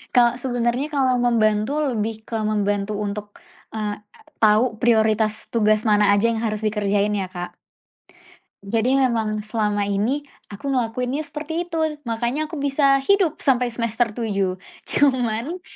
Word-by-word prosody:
Kalau 240 -1 +5
sebenarnya 245 +2 -1
kalau 260 -2 +2
membantu 230 +2 +2
lebih 225 -5 -2
ke 225 - -3
membantu 205 -1 0
untuk, 205 0 -4 0.4
eee, 210 -1 -3 0.5
tahu 220 +2 +4
prioritas 220 -2 +2
tugas 215 -2 +3
mana 210 -1 +4
aja 205 +2 +2
yang 225 -1 -1
harus 215 -1 -2
dikerjain 205 -1 +1
ya 190 - -2
Kak. 175 -1 -7 1.1
Jadi 230 +6 +1
memang 225 -5 +1
selama 210 -2 0
ini 215 +9 -1 0.2
aku 270 +7 -4
ngelakuinnya 250 +3 -1
seperti 315 +3 -5
itu. 330 - -3 0.3
Makanya 240 +7 -1
aku 325 - -6
bisa 275 0 +3
hidup 390 -6 +3
sampai 250 -3 +1
semester 230 0 -1
7. 195 -5 -1 0.3
Cuman 260 +4 +1
225 Hz, 135 wpm, -22 LUFS, 210-260 Hz, 1.1 s, Kalau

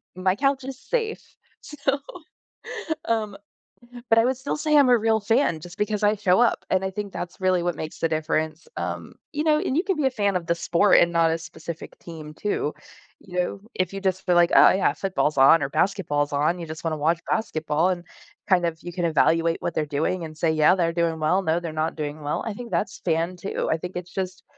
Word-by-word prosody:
my 185 0 +1
couch 275 +3 +1
is 265 0 -7
safe, 450 -3 -2 0.4
so 280 -1 -2 1.1
um 215 -3 -1 0.8
but 225 - +7
I - - +5
would 255 0 0
still 265 +2 -3
say 300 0 +2
I'm 280 -3 +6
a 245 - +6
real 220 0 +2
fan 220 - +1
just 175 +4 -11
because 210 0 -1
I 210 +1 +4
show 195 -2 +2
up, 240 - +2
and 190 0 +1
I 190 - -2
think 200 0 -5
that's 175 +2 -6
really 185 -2 +2
what 175 -1 -1
makes 155 +1 -7
the 165 - +2
difference. 155 0 -2
Um, - - -5 0.2
you 300 +1 -1
know, 305 -1 +3
and 265 - -1
you 340 - +2
can 385 -4 -1
be 295 - 0
a - - +4
fan 205 -5 0
of 175 -2 -2
the 170 - +2
sport 180 +4 +4
and 170 - +3
not 165 -1 +3
a 165 - 0
specific 165 0 -9
team 155 -3 -9
too. 155 -4 -2 0.5
You 180 -1 -5
know, 180 +2 -1 0.2
if 185 0 -1
you 195 - -5
just 190 -1 -1
feel 180 - +3
like, 175 0 +5
"Oh, - - +9
yeah, 190 - +2
football's 185 -6 -1
on 135 +4 +7
or 135 - -2
basketball's 155 -3 0
on," 155 +5 +1
you 170 - -5
just 155 +1 -8
wanna 160 -2 -1
watch 160 +3 +1
basketball 160 -5 0
and, 175 -2 -2 0.5
kind 180 -2 +4
of, 165 -1 -2
you 175 - -6
can 175 -1 -1
evaluate 165 +1 +3
what 170 - -2
they're 155 - 0
doing 155 +5 -1
and 155 -1 -10
say, 160 0 +1
"Yeah, 155 +3 +4
they're 170 -3 +1
doing 165 -1 0
well, 160 +5 +2
no, 165 -2 +1
they're 170 -2 -5
not 155 +1 -1
doing 150 0 -5
well," 145 0 -2
I 225 - -3
think 235 +2 -9
that's 200 - -2
fan 170 +2 0
too. 195 - -3
I 160 - +2
think 180 +3 -7
it's 180 0 -6
just 185 -1 -4
180 Hz, 230 wpm, -24 LUFS, 160-210 Hz, 1.1 s, Oh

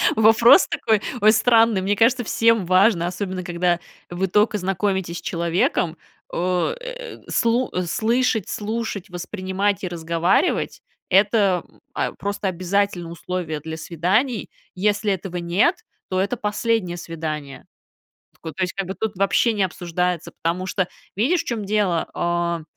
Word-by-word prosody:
Вопрос 225 - +6
такой, 225 -10 +1 0.2
ой, 215 0 +6
странный. 225 -2 +4
Мне 200 +2 +1
кажется, 240 +4 +3
всем 225 -3 +2
важно, 185 -1 +4
особенно 185 0 -4
когда 175 0 0 0.3
вы 180 +2 -1
только 210 +3 +2
знакомитесь 190 -2 -1
с - - -7
человеком, 170 0 0 0.3
э, - - -3
слу 235 +2 +1 0.2
слышать, 225 +1 +1
слушать, 215 -2 -4
воспринимать 190 +2 -2
и - - -1
разговаривать- 170 - 0 0.3
это, 195 -2 +3 0.3
а, - - -1
просто 200 0 -3
обязательное 185 -1 -1
условие 170 -3 -4
для 160 +1 -6
свиданий. 190 - 0 0.2
Если 205 +2 +1
этого 185 -1 -3
нет, 175 - +2 0.3
то 185 - 0
это 200 +6 -1
последнее 210 -4 -1
свидание. 155 -5 -6 0.8
То 160 -2 -6
есть, 185 -1 0
как 195 - -3
бы 190 - -3
тут 220 0 -3
вообще 195 +4 +2
не 205 -2 +1
обсуждается, 180 -1 -2
потому 175 +3 -1
что 185 -1 0 0.3
видишь, 280 - +2
в - - -14
чём 225 -4 -3
дело, 195 -5 +1
а, 170 -1 -1
190 Hz, 135 wpm, -22 LUFS, 175-220 Hz, 0.8 s, Вопрос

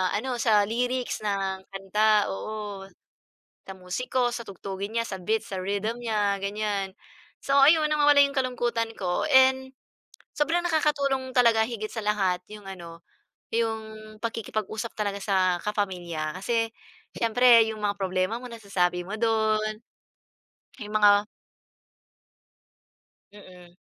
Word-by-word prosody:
ano, 250 +4 -2
sa 210 -3 +4
lyrics 245 0 -2
ng 195 -2 -2
kanta. 210 +2 +2
Oo, 200 - -6 0.8
sa - - -5
musiko, 240 +7 -1
sa 240 0 -4
tugtugin 195 +3 -6
niya, 230 - +1
sa 190 - -5
beats, 220 +5 -1
sa 190 - -3
rhythm 205 +5 -2
niya, 205 -3 0
ganyan. 200 -1 -2 0.5
So 275 - 0
ayun, 305 +2 +6
nawawala 290 -1 +4
yung 280 0 -3
kalungkutan 240 -3 -1
ko. 180 -2 -1
And 265 0 +5 0.6
sobrang 330 +4 +1
nakakatulong 280 -5 0
talaga 230 -2 +5
higit 215 -2 -5
sa 225 - -4
lahat 190 -4 +1
yung 210 -2 -11
ano, 170 -3 -9 0.5
yung 220 -1 -3
pakikipag-usap 220 0 -4
talaga 205 -2 -2
sa 185 -3 +2
kapamilya, 180 -6 -3
kasi 225 +3 0 0.5
siyempre 230 0 +5
yung 215 -1 -8
mga 205 -1 0
problema 185 +3 -1
mo 250 - -7
nasasabi 180 -5 -1
mo 200 - -4
dun. 215 -1 0 1.0
Yung 210 0 -8
mga 205 0 +5 2.1
Mm. 180 -3 -15
215 Hz, 125 wpm, -26 LUFS, 195-235 Hz, 2.1 s, ayun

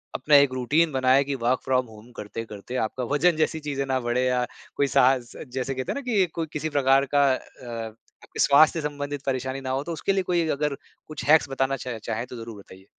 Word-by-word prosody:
अपना 145 +3 +3
एक 140 -2 +6
रूटीन 150 +6 +2
बनाएँ 130 0 +3
कि 140 0 -3
वर्क 125 0 0
फ्रॉम 130 -1 +1
होम 110 +2 -15
करते-करते 105 +2 -7
आपका 125 +3 -6
वजन 165 +4 +3
जैसी 160 0 0
चीज़ें 140 -2 -3
ना 130 -1 0
बढ़ें 120 +1 0
या 125 -1 +1 0.3
कोई 140 - +2
साहस 125 -1 +3 0.2
जैसे 130 +1 -3
कहते 130 0 -3
हैं - - -3
ना 280 - -3
कि 225 -8 +2
कोई 165 -1 -2
किसी 155 +1 -2
प्रकार 135 -1 +3
का 140 - +5
अ, - - -4 0.9
आपके - - -11
स्वास्थ्य 155 +3 +5
से 150 - -1
संबंधित 145 -1 -5
परेशानी 130 0 -2
ना 130 - -5
हो 135 +2 -1
तो 170 - -5
उसके 195 +4 -1
लिए 190 -1 0
कोई 175 -2 0
अगर 150 -1 -1 0.3
कुछ 155 -1 -7
हैक्स 150 -1 +5
बताना 135 0 0
चाहें 120 -3 -6
चाहें 115 +2 -3
तो 125 - -9
ज़रूर 115 -2 -9
बताइए? 95 -1 -15
135 Hz, 220 wpm, -25 LUFS, 125-150 Hz, 0.9 s, एक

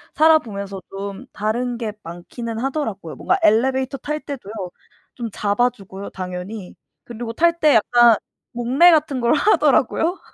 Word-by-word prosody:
살아 315 0 +6
보면서 200 -4 -7
좀 200 +5 -7
다른 235 +3 -2
게 220 -3 -4
많기는 220 +7 -7
하더라고요. 230 - -3
뭔가 375 - 0
엘리베이터 265 +4 +2
탈 300 +2 -3
때도요. 260 -9 -8 0.6
좀 235 -2 -5
잡아 210 +5 +1
주고요 195 -3 -10
당연히. 185 +2 -7 0.3
그리고 235 -1 -6
탈 340 +4 +2
때 300 -2 +5
약간 235 +1 +5 0.4
목례 250 +8 +4
같은 290 -5 +1
걸 235 +5 +3
하더라고요. 355 0 +2
235 Hz, 315 characters per minute, -21 LUFS, 200-275 Hz, 0.6 s, 살아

